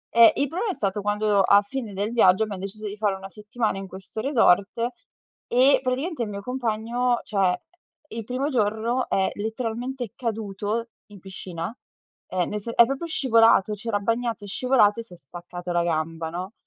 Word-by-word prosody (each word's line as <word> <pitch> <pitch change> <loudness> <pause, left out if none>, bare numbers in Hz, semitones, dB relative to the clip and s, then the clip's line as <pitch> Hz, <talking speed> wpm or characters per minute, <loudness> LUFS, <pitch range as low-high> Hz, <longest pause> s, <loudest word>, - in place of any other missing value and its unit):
eh, 230 -1 +9
il 285 - +1
problema 375 - -2
è - - -6
stato 200 0 -1
quando, 205 0 +2
a 200 +1 +6
fine 225 -1 -5
del 205 +3 -2
viaggio, 220 -3 +5
abbiamo 200 -3 -5
deciso 205 +2 -7
di 205 - -6
fare 205 -2 +1
una 195 0 -9
settimana 215 +1 -3
in 195 - -7
questo 190 +4 -7
resort 230 -4 +3 0.6
e 260 +3 +5
praticamente 265 +3 -2
il 220 - -4
mio 200 -1 -5
compagno 240 +1 -1
cioè, 205 - -3 0.7
eh, 230 - -9
il 225 - -3
primo 255 +5 -2
giorno 230 0 0
è 190 -1 +1
letteralmente 235 +2 -4
caduto 220 -1 -3 0.2
in 205 -1 -13
piscina. 185 +1 -7 0.5
Ehm, 180 -2 -1
nel 210 0 -3
se 230 +3 -5
è 235 - +7
proprio 275 +7 -3
scivolato. 230 - +4
C'era 210 +1 -2
bagnato, 230 +1 -1
è - - -9
scivolato 230 0 +3
e - - -9
si 225 - -16
è - - -12
spaccato 175 +4 -8
la 175 0 +2
gamba, 160 0 -2
no. 180 +4 -5
215 Hz, 185 wpm, -25 LUFS, 195-240 Hz, 0.7 s, eh